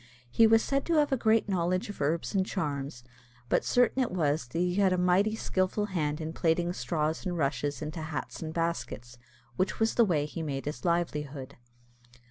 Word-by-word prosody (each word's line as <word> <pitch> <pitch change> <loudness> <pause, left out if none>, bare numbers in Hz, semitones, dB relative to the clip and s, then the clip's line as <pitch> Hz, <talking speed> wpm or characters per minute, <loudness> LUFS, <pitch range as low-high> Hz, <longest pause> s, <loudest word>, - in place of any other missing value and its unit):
He 225 - +6
was 225 0 +5
said 275 0 0
to 335 - +1
have 295 -1 +3
a - - +4
great 225 -3 +2
knowledge 185 -1 0
of 205 - -8
herbs 160 +7 0
and 195 -2 +3
charms; 140 - -3 0.5
but - - +2
certain 245 +2 +2
it 250 - +1
was 155 -6 0
that 125 - -6
he 180 +1 +1
had 195 0 +3
a 185 - +2
mighty 185 +4 +3
skilful 190 0 0
hand 155 -7 -2
in 160 0 -4
plaiting 170 +1 +1
straws 160 -3 -1
and 180 -2 -2
rushes 145 0 -1
into 155 +2 -5
hats 155 -1 -5
and 160 -1 -4
baskets, 160 -7 -3 0.4
which 185 +1 0
was 225 0 +2
the 235 - +5
way 160 -8 +1
he 150 +2 -6
made 140 -4 -3
his 145 -4 -5
livelihood. 150 -5 -2
170 Hz, 195 wpm, -29 LUFS, 150-195 Hz, 0.5 s, He